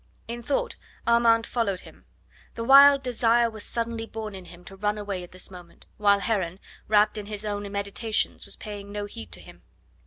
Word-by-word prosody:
In 235 +1 -5
thought 285 - -1 0.3
Armand 230 -1 +4
followed 200 -6 -1
him. - - -16 0.5
The 230 - -3
wild 275 +2 +8
desire 235 -1 +3
was 215 -2 -8
suddenly 230 -1 -3
born 220 -2 -6
in 190 -2 -9
him 175 +1 -14
to 195 - -10
run 210 +2 -1
away 200 -3 -4
at 175 - -11
this 185 +1 -7
moment, 175 -2 -12
while 200 -1 +4
Heron, 190 -5 -1 0.3
wrapped 210 0 +3
in 205 - -8
his 210 0 -5
own 205 -1 -3
meditations, 200 +2 -1
was - - -4
paying 205 -2 -8
no 205 0 -3
heed 110 - -9
to - - -3
him. - - -15
210 Hz, 190 wpm, -26 LUFS, 200-230 Hz, 0.5 s, wild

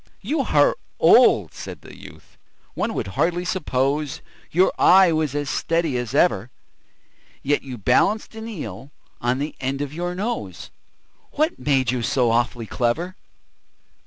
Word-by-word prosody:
"You 285 +10 -2
are 145 - +3 0.2
old," - - +5
said - - -9
the - - -13
youth, - - -15 0.4
"one - - -2
would - - -3
hardly 175 - 0
suppose 145 -5 -1
That - - -14 0.3
your 185 +3 +3
eye 190 -2 +6
was 155 -3 -1
as 145 -1 -2
steady 165 -1 -1
as 125 +1 -3
ever; 120 - +2 0.9
Yet 145 +1 +1
you 130 -3 -8
balanced 130 - +1
an 220 0 -7
eel 135 - -7 0.3
on 125 +1 0
the 145 +3 -3
end 135 +1 -2
of 145 0 -4
your 175 +2 -3
nose 220 +6 -4 0.6
What 310 +3 0
made 135 -4 +1
you 125 -1 -2
so 125 -1 +1
awfully 120 0 0
clever?" 155 - -2
145 Hz, 150 wpm, -22 LUFS, 125-180 Hz, 0.9 s, eye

